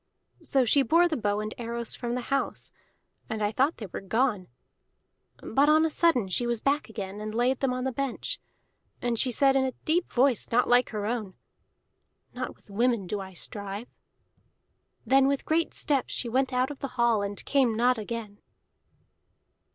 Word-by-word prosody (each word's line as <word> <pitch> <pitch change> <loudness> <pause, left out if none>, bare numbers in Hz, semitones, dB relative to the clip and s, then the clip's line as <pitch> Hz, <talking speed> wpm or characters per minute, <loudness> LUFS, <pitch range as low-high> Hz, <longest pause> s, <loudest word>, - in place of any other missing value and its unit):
So 265 -2 +2
she 275 +5 +4
bore 335 +5 +4
the 325 - -1
bow 205 -4 0
and 215 0 -4
arrows 235 -1 -3
from 240 0 -3
the 250 - -2
house, 275 - -2 0.6
and 220 -1 -2
I 205 - +1
thought 270 +8 +1
they 220 - -6
were 190 - -7
gone; 210 -1 0 1.0
but 280 +5 +3
on 310 +1 +5
a 320 - 0
sudden 295 - +2
she 240 +6 0
was 235 -1 0
back 280 +2 0
again, 205 -2 -6
and 215 0 -5
laid 245 +2 +2
them 270 -2 +1
on 250 0 -2
the 265 - -1
bench. 275 0 -3 0.6
And 235 -2 -1
she 260 - +2
said 270 +2 +3
in 270 - +3
a 260 -1 -1
deep 335 +3 +1
voice 255 -1 +2
not 245 +2 +3
like 245 +1 +4
her 210 -2 -3
own: 215 -4 -3 1.0
"'Not - - -5
with - - -21
women 235 -1 +1
do 205 +3 -3
I 190 -1 -8
strive.' 205 +4 -6 1.1
"Then 270 0 +5
with 280 0 0
great 325 +1 +1
steps 280 -3 -1
she 245 - 0
went 260 +3 +1
out 255 +2 +1
of 285 - -9
the 275 - -3
hall, 235 -3 +3
and 200 0 -4
came 260 -6 +2
not 245 0 +3
again." 215 -1 -6
240 Hz, 185 wpm, -27 LUFS, 215-270 Hz, 1.1 s, on